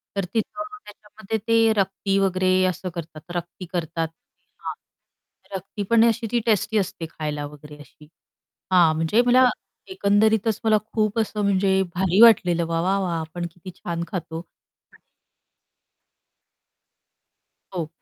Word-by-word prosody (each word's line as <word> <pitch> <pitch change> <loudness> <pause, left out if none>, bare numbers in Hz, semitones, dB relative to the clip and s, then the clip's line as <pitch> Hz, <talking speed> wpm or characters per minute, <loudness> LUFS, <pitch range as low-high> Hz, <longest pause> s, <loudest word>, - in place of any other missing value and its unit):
तर 195 - -1
तिथं 230 +8 -2 0.2
त्याच्यामध्ये 210 +1 -6
ते 225 -1 +4
रक्ती 195 0 0
वगैरे 185 -1 +2
असं 185 +1 -4
करतात. 160 -2 -7
रक्ती 175 +2 -5
करतात 165 -1 -2
ते 165 - -33 0.2
हां, - - -3 0.8
रक्ती 195 +2 -5
पण 230 -1 +5
अशी 230 0 -2
ती 240 - +2
टेस्टी 220 0 +2
असते 185 -4 -2
खायला 150 -2 -4
वगैरे 150 0 -13
अशी 150 +1 -17 0.7
हां, 170 -4 +5
म्हणजे 165 +9 +2
मला 250 +1 +6 0.4
एकंदरीतच 215 - +2
मला 215 -1 +4 0.2
खूप 215 0 +1
असं 215 -1 -1
म्हणजे 190 -1 +2
भारी 190 +3 +2
वाटलेलं 180 -7 +6
वाह! 165 0 0
वाह! 195 +2 +1
वाह! 170 -3 -1
आपण 170 +2 -5
किती 180 +2 -11
छान 170 -1 -4
खातो 165 -3 -5 0.5
आणि - - -21 2.7
हो. 165 -3 -3
190 Hz, 135 wpm, -23 LUFS, 170-215 Hz, 2.7 s, मला